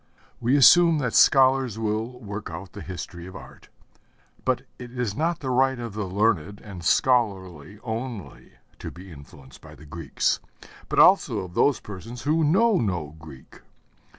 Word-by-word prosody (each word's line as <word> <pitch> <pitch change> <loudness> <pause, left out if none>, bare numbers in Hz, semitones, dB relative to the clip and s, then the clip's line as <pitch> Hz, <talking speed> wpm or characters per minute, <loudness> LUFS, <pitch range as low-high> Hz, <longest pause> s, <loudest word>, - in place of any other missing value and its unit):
We 125 +5 +2
assume 165 +4 +6
that 125 -6 -2
scholars 130 -4 +4
will 110 +3 -3
work 100 -4 -7
out 90 +2 -8
the 105 - -9
history 90 -2 -8
of 95 - -11
art. - - -13 0.7
But - - 0 0.2
it 125 -1 -9
is 115 -5 -2
not 165 +2 -1
the 130 -3 -3
right 130 +1 +2
of 120 -3 -6
the 105 -2 -4
learned 100 -1 0
and 95 -5 -10
scholarly 95 - 0
only, 115 -2 -7 0.3
to - - -6
be 90 +1 -13
influenced 70 -2 -15
by - - -14
the 75 - -15
Greeks, 80 +3 -2 0.5
but - - -3
also - - +5
of 90 -2 -9
those 140 +5 +2
persons 110 +4 -9
who 160 +2 +1
know 195 +7 +3
no 85 -8 -3
Greek. 75 -5 -14
110 Hz, 160 wpm, -24 LUFS, 90-130 Hz, 0.7 s, assume